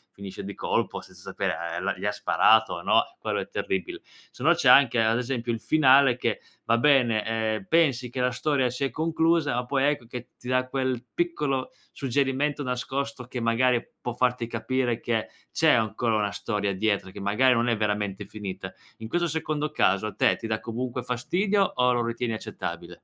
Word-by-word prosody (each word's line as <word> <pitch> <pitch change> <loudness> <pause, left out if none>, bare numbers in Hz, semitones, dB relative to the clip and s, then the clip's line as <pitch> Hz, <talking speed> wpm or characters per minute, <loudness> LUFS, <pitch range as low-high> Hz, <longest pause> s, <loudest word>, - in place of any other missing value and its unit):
finisce 100 -1 -8
di 100 +1 -6
colpo - - -2
senza - - -15
sapere, - - -2 0.2
ehm, - - -4
la - - -1
gli - - -6
ha - - +2
sparato 110 +4 +3
o 85 - -5
no. - - +4 0.2
Quello - - -2
è - - -5
terribile. 95 -1 -3
Se 125 - -15
no 170 +3 +6
c'è 165 -7 +2
anche 125 -3 +6
ad 110 +1 +2
esempio 120 -1 -2
il 115 - -2
finale 135 -4 +5
che - - -1 0.3
va 115 - +3
bene, 120 -5 +3
ehm, 110 -2 -1
pensi 135 -7 +2
che 130 - -5
la 125 - +2
storia 130 0 0
si 125 +3 -4
è 135 - 0
conclusa, 160 -2 +1
ma 125 0 -1
poi 135 +1 +1
ecco 145 -4 0
che 125 +1 -8
ti 125 - -12
dà 130 0 +1
quel 130 -2 -2
piccolo 150 -6 -1 0.2
suggerimento 140 +2 -1
nascosto 130 +1 -3
che 125 0 -6
magari 120 +1 +2 0.2
può 120 - -3
farti 125 -1 0
capire 120 +1 -1
che 115 -2 -2 0.2
c'è 160 -1 +4
ancora 115 0 +1
una 105 -2 0
storia 105 -3 -2
dietro, 100 -1 0
che - - -10
magari 105 +6 +3
non 115 +1 +1
è 115 - +2
veramente 105 -2 -2
finita. 95 -2 -7 0.3
In 110 - -8
questo 175 +4 +1
secondo 155 -1 -2
caso 95 +3 +2
a - - -6
te - - +3
ti - - -9
dà 110 -1 -1
comunque 120 +2 -4
fastidio 185 - 0
o 125 0 +3
lo 120 -1 +1
ritieni 115 0 -2
accettabile? 110 - -6
125 Hz, 195 wpm, -26 LUFS, 110-135 Hz, 0.3 s, no